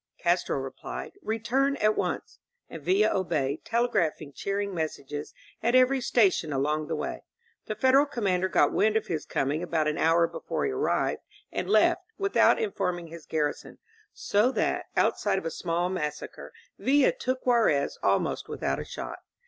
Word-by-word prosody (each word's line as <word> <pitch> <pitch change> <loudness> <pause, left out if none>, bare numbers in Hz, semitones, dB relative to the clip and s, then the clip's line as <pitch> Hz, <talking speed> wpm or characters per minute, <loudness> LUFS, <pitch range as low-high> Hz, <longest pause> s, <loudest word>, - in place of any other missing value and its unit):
Castro 175 -3 +1
replied: 135 -1 -6
"Return 245 - 0
at 215 -5 +2
once." - - -3 0.3
And 165 - -7
Villa 195 +7 +2
obeyed, 155 -7 -1
telegraphing 175 -11 0
cheering 200 +3 -2
messages 150 -3 -4 0.3
at 240 +2 +2
every 255 +1 +4
station 195 -10 +2
along 150 +3 0
the 160 - -2
way. 150 - -4 0.4
The 215 - -3
Federal 265 +5 +4
commander 190 -8 0
got - - +3
wind 215 0 +3
of - - -2
his 160 -3 -4
coining 145 +4 -1
about 165 -3 0
an 150 - -1
hour 165 +1 +4
before - - -3
he 420 - 0
arrived, 410 +2 0 0.3
and - - -3
left, - - +4 0.2
with 395 -1 -2
out - - +6
informing 180 - -2
his 165 -1 -11
garrison, 150 -2 -2 0.3
so 210 +5 +1
that, - - 0
outside 200 -2 +2
of 190 - -4
a 165 - -2
small 170 +2 -1
massacre. 150 -5 -5 0.3
Villa 275 +1 +4
took 255 0 -3
Juarez 230 - +2
almost - - 0
without - - -2
a - - -3
shot. - - -7
185 Hz, 160 wpm, -27 LUFS, 155-235 Hz, 0.4 s, out